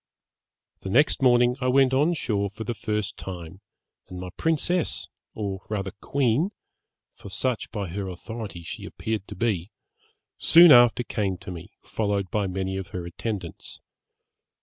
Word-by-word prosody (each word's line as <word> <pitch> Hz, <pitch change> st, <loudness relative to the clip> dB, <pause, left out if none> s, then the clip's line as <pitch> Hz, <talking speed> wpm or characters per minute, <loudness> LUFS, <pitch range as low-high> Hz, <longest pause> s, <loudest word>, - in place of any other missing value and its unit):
'The 95 Hz, -, -6 dB
next 140 Hz, +9 st, +3 dB
morning 125 Hz, -1 st, +5 dB
I 125 Hz, -, +1 dB
went 130 Hz, 0 st, +4 dB
on 150 Hz, +6 st, +3 dB
shore 100 Hz, -9 st, -1 dB
for 110 Hz, +3 st, -7 dB
the 120 Hz, -, -2 dB
first 105 Hz, -2 st, -3 dB
time, 90 Hz, 0 st, -8 dB, 0.5 s
and 90 Hz, -1 st, -8 dB
my 90 Hz, 0 st, -6 dB
princess 165 Hz, +2 st, 0 dB, 0.3 s
or 100 Hz, -3 st, -3 dB
rather 100 Hz, -3 st, -2 dB
queen, 140 Hz, -, +1 dB, 0.6 s
for -, -, -11 dB
such 115 Hz, +4 st, -1 dB
by 100 Hz, -2 st, -4 dB
her 95 Hz, +3 st, -4 dB
authority 95 Hz, 0 st, -7 dB
she -, -, -7 dB
appeared 110 Hz, -3 st, -4 dB
to 105 Hz, -, -8 dB
be, 100 Hz, -3 st, -1 dB, 0.7 s
soon 170 Hz, 0 st, +8 dB
after 120 Hz, -1 st, +7 dB
came 100 Hz, -5 st, -2 dB
to 95 Hz, -, -9 dB
me, 90 Hz, +4 st, -9 dB
followed 100 Hz, -4 st, -1 dB
by 105 Hz, -2 st, 0 dB
many 95 Hz, +1 st, -2 dB
of 95 Hz, -2 st, -5 dB
her 90 Hz, 0 st, -6 dB
attendants. 90 Hz, 0 st, -5 dB
105 Hz, 150 wpm, -26 LUFS, 95-120 Hz, 0.7 s, soon